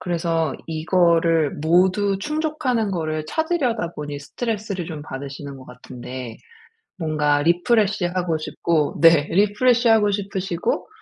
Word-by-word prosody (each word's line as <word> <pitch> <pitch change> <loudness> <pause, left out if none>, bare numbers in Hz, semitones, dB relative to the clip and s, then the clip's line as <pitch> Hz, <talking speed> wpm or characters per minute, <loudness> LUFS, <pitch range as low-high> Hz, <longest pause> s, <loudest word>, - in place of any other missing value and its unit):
그래서 165 -3 -1
이거를 165 -1 +2
모두 190 +4 +2
충족하는 295 -5 -1
거를 155 -3 -2
찾으려다 260 - -1
보니 145 -1 -6
스트레스를 205 - -4
좀 155 -3 -7
받으시는 140 0 -7
것 130 - -12
같은데. 125 -1 -9 0.6
뭔가 155 -3 +1
refresh 185 +4 +2
하고 175 -3 0
싶고 155 0 -1
네. 165 -3 +6
refresh 230 +6 +3
하고 215 -2 +4
싶으시고. 195 -3 -2
175 Hz, 330 characters per minute, -22 LUFS, 155-205 Hz, 0.6 s, 네